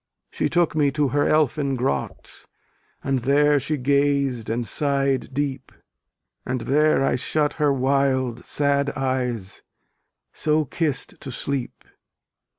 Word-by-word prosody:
She - - -1
took 175 -2 +2
me 145 -2 +3
to 145 -2 +1
her 145 +1 +1
elfin 145 -2 +1
grot, 120 - -4 0.6
And 135 -1 0
there 145 +3 +3
she 150 +3 -2
gaz'd 140 -3 +1
and 115 +1 -1
sighed 140 0 0
deep, 135 -1 -3 0.7
And 130 -1 -3
there 150 +2 +2
I - - +1
shut 145 +4 0
her 145 -1 +4
wild 130 -2 0
sad 140 -1 0
eyes 125 -7 -2 0.7
So 155 0 +1
kiss'd 150 0 -2
to 135 - -6
sleep. 130 0 -4
140 Hz, 125 wpm, -23 LUFS, 130-145 Hz, 0.7 s, her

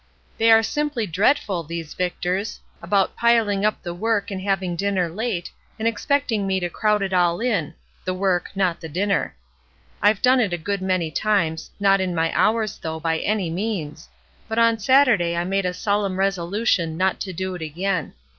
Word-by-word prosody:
They 225 0 +4
are 225 0 +7
simply 295 -2 -1
dreadful, 195 - +1
these 165 -1 -6
Victors, 180 +3 -2 0.2
about 195 -2 +1
piling 225 -4 +2
up 215 0 0
the 175 - -4
work 215 +3 -1
and 190 -1 -4
having 190 -2 -1
dinner 190 -1 0
late, 195 -1 -3 0.3
and 220 0 -1
expect 280 +4 0
ing 205 -3 0
me 190 -1 +1
to 175 -1 -3
crowd 210 -2 +1
it 190 -1 -3
all 175 -1 +2
in, 185 - -1 0.3
the 185 - -2
work, 185 -2 0
not 185 -3 0
the 160 - -7
dinner. 195 - -1 0.7
I've 205 0 +4
done 255 +1 +5
it 205 -7 +1
a - - 0
good 200 +4 -3
many 185 -4 0
times, 165 -4 0
not 195 -1 +4
in 180 -2 -2
my 165 0 0
hours 220 -1 +1
though, 160 -1 -4
by 160 0 0
any 200 -5 -1
means; 170 -5 -4 0.4
but 220 - -4
on 230 -1 +4
Saturday 225 -8 +4
I 170 - +1
made 195 +1 0
a - - 0
solemn 200 -1 -1
resolution 190 -2 0
not 190 +1 +1
to 190 - -4
do 185 +1 -4
it 180 - -7
again. 170 +2 -2
195 Hz, 185 wpm, -22 LUFS, 175-215 Hz, 0.7 s, are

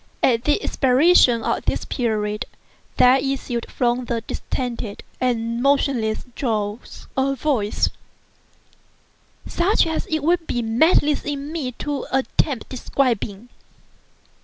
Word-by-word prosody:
At 235 -1 +3
the 300 +8 +2
expiration 260 -3 +4
of - - -1
this - - -1
period, 210 -4 -2 0.5
there 255 +2 +6
issued 260 -3 -3
from 245 0 0
the 235 -1 -2
distended 235 -2 -4 0.2
and 235 -2 -1
motionless 265 -5 +1
jaws 215 -3 -3
a 270 +1 +1
voice—such 295 - -3
as 320 -1 -2
it 315 -2 -1
would 335 +1 +1
be 240 - -1
madness 290 +6 +3
in 285 0 -4
me 285 -7 -3
to 285 +2 -4
attempt 265 0 0
describing. 240 -4 -1
255 Hz, 110 wpm, -22 LUFS, 230-285 Hz, 0.5 s, there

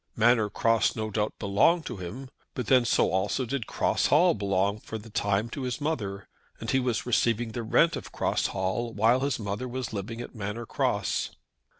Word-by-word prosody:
Manor 115 -1 +4
Cross 115 +2 +2
no 110 -1 -3
doubt 105 +1 -1
belonged 135 - +3
to 120 - -5
him, 120 +9 -7 0.2
but 125 - -2
then 125 +1 +4
so - - +3
also 100 +7 0
did 120 -2 -3
Cross - - +1
Hall 175 +5 +5
belong 100 0 0
for 110 - -6
the 110 +1 -12
time 100 0 0
to 140 - -5
his 125 0 -3
mother; 105 -11 -3 0.3
and - - -3
he 130 - +3
was 125 -3 -1
receiving 115 0 +1
the 120 - -4
rent 160 +9 +3
of - - -7
Cross - - 0
Hall 95 +5 -2
while 115 +4 +4
his 140 +1 0
mother 105 +3 -4
was 125 -2 -4
living 110 +3 -5
at 120 - -7
Manor 110 +1 -5
Cross. - - -1
115 Hz, 195 wpm, -27 LUFS, 105-125 Hz, 0.3 s, Hall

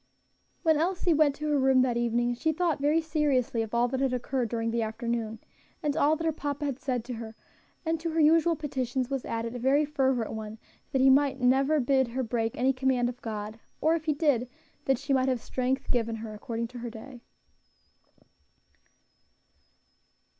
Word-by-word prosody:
When 320 -3 +4
Elsie 355 +1 +1
went 295 -2 +3
to 300 +1 -4
her 295 -1 +2
room 265 -1 +4
that 250 -2 0
evening 240 0 +1
she 280 +7 0
thought 325 -3 0
very 300 +3 +3
seriously 290 -7 0
of 220 -1 -4
all 240 +1 +3
that 260 +1 -2
had 265 -1 +1
occurred 250 -1 -1
during 230 0 -1
the 235 0 0
afternoon, 225 0 -3 0.5
and 295 -1 0
all 300 +2 +3
that 330 - -5
her 325 - +2
papa 290 -1 -4
had 275 -2 -3
said 250 -5 -2
to 250 - -5
her; 225 -1 -7 0.5
and 325 0 0
to 335 +1 -3
her 325 0 -1
usual 325 +2 +4
petitions 260 -4 -3
was 270 -2 -2
added 230 0 -3
a 245 - -5
very 275 +5 +3
fervent 265 -6 0
one 220 0 -6 0.3
that 265 -2 +1
he 265 0 +7
might 275 0 +3
never 270 +4 +3
bid 265 0 +2
her 255 +3 -3
break 225 -1 -2
any 265 +2 +2
command 260 -2 +1
of 245 - -9
God; 215 0 -5 0.2
or 315 - +3
if 325 -2 -2
he 310 - +2
did, 280 -5 +1 0.4
that 270 -2 +2
she 280 +2 -2
might 260 0 +2
have 255 -2 0
strength 260 +3 -2
given 230 -2 0
her 220 -1 -7
according 230 +2 -4
to 250 0 -9
her 240 0 -5
day. 240 +2 -11
260 Hz, 195 wpm, -28 LUFS, 235-290 Hz, 0.5 s, he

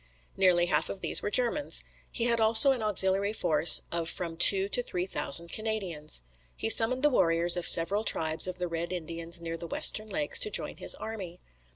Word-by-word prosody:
Nearly 180 -2 0
half - - -3
of 195 - -10
these - - +4
were - - -5
Germans. 250 +6 -1 0.3
He 235 - -4
had 235 -1 0
also 220 +4 +6
an 255 -3 -4
auxiliary 200 -1 +1
force 155 -5 +4
of 170 -1 -5
from 170 -2 -8
two 190 +3 +5
to 245 - +1
three 180 -7 -6
thousand 170 -2 +3
Canadians. 190 - -6 0.3
He 225 - -1
summoned 255 +5 +2
the 295 - +2
warriors 170 -5 0
of 175 - 0
several 200 +6 +3
tribes 160 -4 0
of 185 - -6
the 180 0 -6
Red 170 +1 -7
Indians 170 -1 -6
near 165 0 -8
the 170 - -10
western 215 +6 -2
lakes 295 +5 -2
to 430 - +2
join - - -2
his - - +1
army. 190 -6 -11
185 Hz, 195 wpm, -25 LUFS, 170-220 Hz, 0.3 s, also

